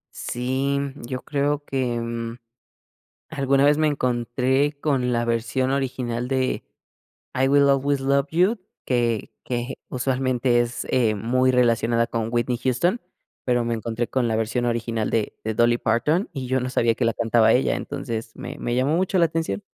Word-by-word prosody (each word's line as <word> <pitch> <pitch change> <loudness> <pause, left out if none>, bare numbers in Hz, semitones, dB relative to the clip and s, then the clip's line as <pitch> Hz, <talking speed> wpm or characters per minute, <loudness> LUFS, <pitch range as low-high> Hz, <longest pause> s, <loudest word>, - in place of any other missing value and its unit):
Sí, 130 +3 -1 0.3
yo 130 +1 -5
creo 145 0 -1
que, 125 -3 -1
mm, 115 0 -4 0.9
alguna 140 -2 +2
vez 150 +1 +4
me 155 - +3
encontré 130 +2 0
con 135 -5 0
la 120 -1 0
versión 120 +3 0
original 125 -3 -2
de: 130 -1 -1 0.7
"I 130 +1 +2
Will 140 0 +5
Always 140 0 +2
Love 140 +1 +1
You", 185 +8 +2 0.3
que 120 -3 0
que 125 +1 -3 0.2
usualmente 130 -1 +1
es, 120 0 -2
eh, 115 -4 +2
muy 130 +5 +2
relacionada 115 -2 +2
con 115 -1 -2
Whitney 120 +1 +1
Houston, 130 - +1 0.5
pero 120 -1 +2
me 115 - 0
encontré 115 +1 -3
con 130 -2 0
la 110 -1 0
versión 115 +2 -1
original 115 -2 -1
de 110 -2 -1
de 110 - -1
Dolly 120 +2 +3
Parton 120 - +1
y 135 -3 -5
yo 130 +1 +1
no 125 +1 -3
sabía 115 -2 +2
que 120 - -1
la 115 - +2
cantaba 115 0 +3
ella, 130 - +2
entonces 115 -2 -5
me - - -7
me 120 - -2
llamó 135 +6 +2
mucho 185 +1 +1
la 170 - +5
atención. 160 -11 -3
125 Hz, 165 wpm, -23 LUFS, 115-135 Hz, 0.9 s, Will